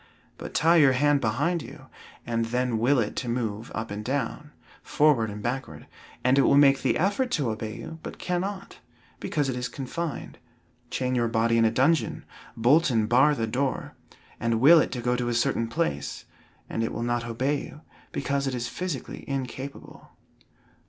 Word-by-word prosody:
But - - -8
tie 165 +2 +5
your 140 -4 +6
hand 145 +2 +3
behind 145 +10 0
you, 135 +2 -11 0.4
and 115 -1 -1
then 125 0 -1
will 130 +5 +3
it 110 -4 -1
to 125 - -2
move 115 -2 -3
up 110 -1 -4
and 105 +1 -5
down, 140 +4 -3 0.3
forward 145 -7 +2
and 105 0 -7
backward, 130 +3 -4 0.4
and 130 +2 +4
it - - +7
will 140 - +4
make 140 -1 +5
the - - +1
effort 205 +9 +1
to 140 -8 +1
obey 110 0 -5
you, 160 - -8
but - - -8
cannot, 190 +2 -4 0.4
because 145 -3 -1
it 130 - -2
is 125 0 -3
confined. 145 +4 -5 0.5
Chain 130 0 -1
your 120 -2 +1
body 115 0 +1
in 115 -1 +4
a 110 - +3
dungeon, 140 +7 +1 0.3
bolt 140 +9 +4
and 110 -4 +1
bar 135 +6 +4
the 115 - -1
door, 130 +3 -2 0.5
and 115 0 0
will 160 +7 +8
it - - 0
to 125 - -4
go 125 +1 +1
to 125 -1 -1
a 120 - -1
certain 115 -1 +1
place, 75 -10 -3 0.4
and 115 - -2
it 115 - -2
will 115 - -3
not 120 0 -1
obey 130 +5 -1
you, 150 - -11 0.3
because 140 0 -1
it 130 - -2
is 120 -1 -3
physically 170 0 -5
incapable. 135 0 -6
125 Hz, 185 wpm, -26 LUFS, 115-145 Hz, 0.5 s, will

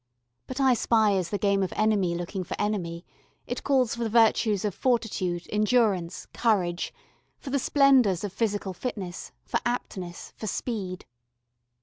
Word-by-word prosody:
But 260 +1 -5
"I 265 -2 +5
spy" 220 -2 +3
is 185 -3 0
the 205 - -1
game 200 0 +2
of 190 - -1
enemy 205 -5 +2
looking 175 +2 -4
for - - -6
enemy: 180 -5 -2 0.4
it 245 - -4
calls 260 -5 +2
for 235 - -3
the 225 - -1
virtues 220 -2 +3
of 205 - -1
fortitude, 200 -9 0
endurance, 210 -5 +1
courage 185 -7 +1 0.5
for 270 - -8
the 280 - +2
splendours 255 - +4
of 200 -3 -4
physical 205 -3 -1
fitness, 185 -4 -5
for - - -1
aptness, 185 -7 -4
for 215 - -5
speed. 195 -4 -4
210 Hz, 150 wpm, -27 LUFS, 185-235 Hz, 0.5 s, I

